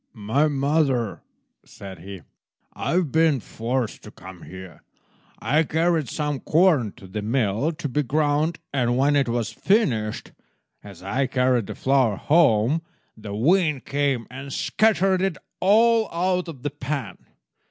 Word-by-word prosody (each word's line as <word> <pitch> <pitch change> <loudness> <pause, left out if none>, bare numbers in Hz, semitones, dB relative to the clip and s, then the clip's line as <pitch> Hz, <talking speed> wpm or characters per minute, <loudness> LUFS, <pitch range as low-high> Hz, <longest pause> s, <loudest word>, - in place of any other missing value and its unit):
"My 115 +8 +1
mother," 140 -5 0 0.4
said 95 -3 -11
he, 95 +1 -9 0.5
"I - - -3
have 175 -5 +1
been 160 -4 +3
forced 115 +1 -3
to - - -11
come 95 -3 -13
here. 95 -3 -11 0.6
I 150 +3 +1
carried 160 -2 0
some 150 -3 -2
corn 155 - +2
to - - -15
the 95 +3 -5
mill 115 +5 0
to 150 - -5
be 145 +3 0
ground, 150 +3 0 0.2
and 120 -3 +1
when 145 +2 +3
it 140 -4 +2
was 115 -1 -1
finished, 120 - 0 0.5
as 95 -3 -12
I 130 +8 -1
carried 125 -4 +1
the - - -6
flour 130 -5 +2
home, 145 -1 +3 0.3
the 105 -2 -7
wind 155 - +2
came 140 -4 -1
and 135 +2 -8
scattered 195 +1 +2
it 190 -4 -1 0.2
all 225 +3 +4
out 180 +1 0
of 140 -6 -9
the 145 - -2
pan. 135 -8 -5
135 Hz, 145 wpm, -23 LUFS, 110-160 Hz, 0.6 s, all